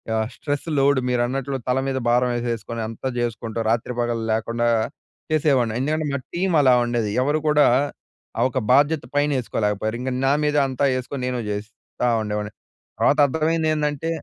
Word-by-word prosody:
ఆహ్, 110 0 0
stress 145 +2 -3
load 140 0 +4
మీరన్నట్లు 130 +3 -1
తల 125 +1 +2
మీద 130 -1 -1
భారం 125 +1 +3
యేసేసుకొని, 115 -1 -3
అంతా 115 +4 -4
జేసుకుంటూ 115 -1 -3
రాత్రి, 120 +2 -1
పగలు 120 -1 -1
లేకుండా 115 +2 -1 0.6
చేసేవాడిని. 135 -7 +2
ఎందుకంటే 155 +3 0
మా - - -1 0.2
టీమలా 160 -8 +4
ఉండేది. 115 -3 -1
ఎవరు 150 +3 +1
కూడా 150 -1 +5 0.7
ఆహ్, 120 - +3
ఒక 130 - -1
బాధ్యత 145 +2 +3
పైన 145 +1 +2
యేసుకోలేకపోయారు. 110 -1 -1
ఇంక 130 +1 -2
నా 135 - +4
మీద 150 0 +1
అంతా 135 +2 +1
యేసుకొని 130 +1 -4
నేను 125 -1 -2
జేస్తా 110 +3 -4
ఉండేవాడిని. 105 0 -3 0.5
తర్వాత 145 - +3
అర్థమైందేంటంటే 155 0 0
125 Hz, 150 wpm, -22 LUFS, 115-145 Hz, 0.7 s, కూడా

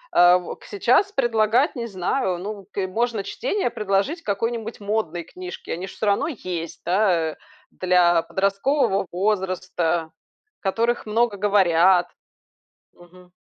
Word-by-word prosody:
А 175 +1 +7
во 180 - -6
к - - -21
сейчас 250 - +2
предлагать, 240 - +2
не 235 -2 -4
знаю, 185 0 -1
ну, 200 +1 -7
к 195 -2 -2
можно 225 +1 -1
чтение 410 - -2
предложить 210 - -1
какой-нибудь 225 +1 -3
модной 200 -5 -2
книжки. 180 +2 -9
Они 180 +3 -4
ж - - -9
всё - - -4
равно 200 +5 +2
есть, 175 - -5
да? 175 -4 +2
Э. - - -12 0.4
Для 180 -2 +3
подросткового 195 - 0
возраста, 180 -4 -1 0.5
которых 230 +4 0
много 225 -1 +1
говорят. 185 -3 +4 0.9
Мгм. 180 +1 -19
195 Hz, 130 wpm, -23 LUFS, 180-225 Hz, 0.9 s, А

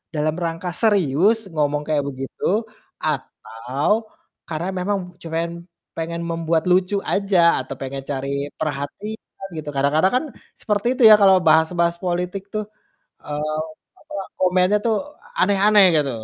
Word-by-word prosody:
dalam 155 +1 0
rangka 170 +1 -3
serius 205 - +2
ngomong 150 -1 0
kayak 150 -2 +1
begitu, 140 - -2 0.4
atau 145 - -2 0.4
karena 170 +3 -3
memang 180 -2 -3
cuman 170 +1 -3 0.3
pengen 170 +1 -3
membuat 165 -1 0
lucu 185 +2 +3 0.2
aja, 185 -6 +3
atau 135 - -7
pengen 135 0 -5
cari 140 +1 -2
perhatian, 160 +8 -5
gitu. 150 -1 -5
Kadang-kadang 150 - +2
kan 255 - +2 0.3
seperti 210 +1 -1
itu 250 - +2
ya 215 - +10
kalau 190 -1 +7
bahas-bahas 170 +2 +3
politik 180 +2 -2
tuh, 215 -1 -2 0.6
eee, 150 +1 -3 0.4
apa, - - -15 0.3
komennya 185 +2 +3
tuh 225 -2 +3 0.4
aneh-aneh 205 0 +5
gitu. 140 -3 +1
170 Hz, 125 wpm, -21 LUFS, 150-195 Hz, 0.6 s, ya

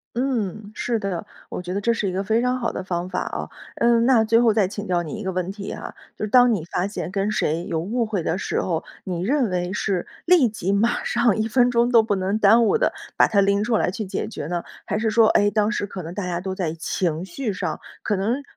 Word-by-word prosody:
嗯， 220 -5 -2
是 235 -2 -1
的， 195 -4 -3 0.2
我 - - -5
觉 180 +1 -5
得 200 - -1
这 235 +3 +2
是 210 -4 -1
一 - - -3
个 190 +2 -1
非 220 +4 +1
常 250 +1 0
好 235 - 0
的 - - -4
方 175 -1 -3
法 180 - -2
啊。 - - -4 0.3
嗯， 235 0 +3
那 240 -3 +5
最 225 +1 +4
后 230 -2 +4
再 205 -3 +3
请 205 +2 -6
教 175 -2 +1
你 160 - -6
一 215 -1 -5
个 190 - -2
问 185 0 -2
题 200 0 -6
啊， - - -7 0.2
就 - - -2
是 - - -6
当 245 +1 +6
你 175 -7 -2
发 175 +2 -1
现 200 -3 -4
跟 200 +1 0
谁 170 -4 0
有 160 - 0
误 225 +8 -1
会 210 -5 -2
的 165 +3 -1
时 - - -2
候， 165 -3 -1 0.2
你 175 -2 -3
认 250 +2 +1
为 180 0 -2
是 195 -3 -1 0.2
立 330 -9 +5
即、 200 -2 -2
马 220 +4 +2
上、 235 -4 +2
1 220 +1 0
分 245 +2 +3
钟 235 0 +3
都 230 -2 +6
不 210 -2 0
能 190 +3 0
耽 225 +3 +6
误 455 - +3
地 - - +2 0.2
把 - - +6
它 205 - +2
拎 200 +1 +3
出 225 0 +1
来 - - +1
去 200 +4 -4
解 190 - -3
决 155 -9 -6
呢？ 175 0 -2 0.2
还 210 - -1
是 220 0 +1
说， 225 0 +5
哎， 205 0 +4
当 210 +1 +1
时 205 -4 -2
可 185 -2 -7
能 165 +2 -7
大 200 0 -4
家 175 -1 -2
都 190 +1 -3
在 180 -5 -2
情 165 0 -2
绪 210 +4 -4
上， - - -3 0.2
可 205 - 0
能 230 +9 -1
205 Hz, 280 characters per minute, -23 LUFS, 185-230 Hz, 0.3 s, 当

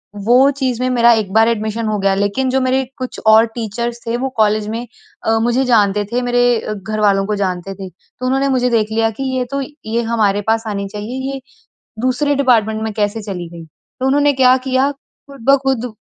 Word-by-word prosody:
वो 245 +7 +4
चीज़ 255 -3 -1
में 255 - +1
मेरा 235 -1 +4
एक 215 -4 -1
बार 225 +1 +5
एडमिशन 220 0 -2
हो 215 - 0
गया। 195 0 +2
लेकिन 205 +7 0
जो 265 +1 +1
मेरे 260 +1 +1
कुछ 255 -1 -6
और 220 +1 +7
टीचर्स 235 +1 -4
थे, 230 0 -1
वो 265 +2 -2
कॉलेज 215 0 +2
में 230 +3 -4 0.4
अ, 225 0 +2
मुझे 240 +3 +1
जानते 210 -4 +2
थे 245 - 0
मेरे 245 0 +1 0.3
घरवालों 205 -1 0
को 210 +1 -1
जानते 190 -1 -3
थे। 190 -1 -8
तो 255 - -12
उन्होंने 270 +2 +1
मुझे 250 -1 +1
देख 220 -2 0
लिया 225 0 +1
कि - - -1
ये 250 - -1
तो 275 0 -1 0.2
ये 225 +2 -1
हमारे 205 -3 +2
पास 225 0 +1
आनी 200 -2 -3
चाहिए 250 +6 -4
ये 270 - -6 0.6
दूसरे 255 +3 +1
डिपार्टमेंट 225 -5 +2
में 220 -1 -3
कैसे 205 +1 -1
चली 190 -4 -6
गई। 170 -1 -10
तो 210 - -10
उन्होंने 285 +1 +3
क्या 255 -1 +5
किया, 260 +2 +2
खुद 280 -1 -17
ब 275 - +7
खुद 250 -3 -1
230 Hz, 205 wpm, -17 LUFS, 210-255 Hz, 0.6 s, और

